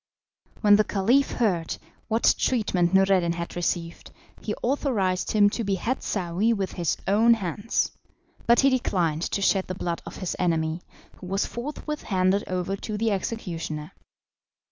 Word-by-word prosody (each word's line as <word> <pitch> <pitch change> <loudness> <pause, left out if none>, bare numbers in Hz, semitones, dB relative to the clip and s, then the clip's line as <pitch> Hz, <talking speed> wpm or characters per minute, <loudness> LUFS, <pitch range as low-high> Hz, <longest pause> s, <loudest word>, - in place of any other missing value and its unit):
When 205 -1 +6
the 215 - +4
Caliph 230 +8 +2
heard 180 -9 0 0.3
what 225 +1 +3
treatment 195 -8 +1
Noureddin 190 -3 +3
had 170 0 -5
received, 170 -1 -3 0.3
he 210 - -3
authorised 230 -9 0
him 205 -1 +5
to 230 - -2
behead 200 +6 -1
Saouy 195 +4 0
with 195 -4 -2
his 170 -4 -1
own 225 +4 +5
hands, 205 +2 -1 0.6
but 235 0 +6
he 275 0 +4
declined 175 -11 0
to 200 +3 -1
shed 195 -1 +2
the 185 - -4
blood 170 -2 -3
of - - -8
his 185 - -3
enemy, 165 -1 0 0.4
who 180 - -10
was 195 +2 0
forthwith 295 +4 -5
handed 190 +1 +1
over 185 +1 -2
to 210 +1 -5
the 225 +1 +1
executioner. 170 -7 -4
195 Hz, 150 wpm, -25 LUFS, 175-225 Hz, 0.6 s, When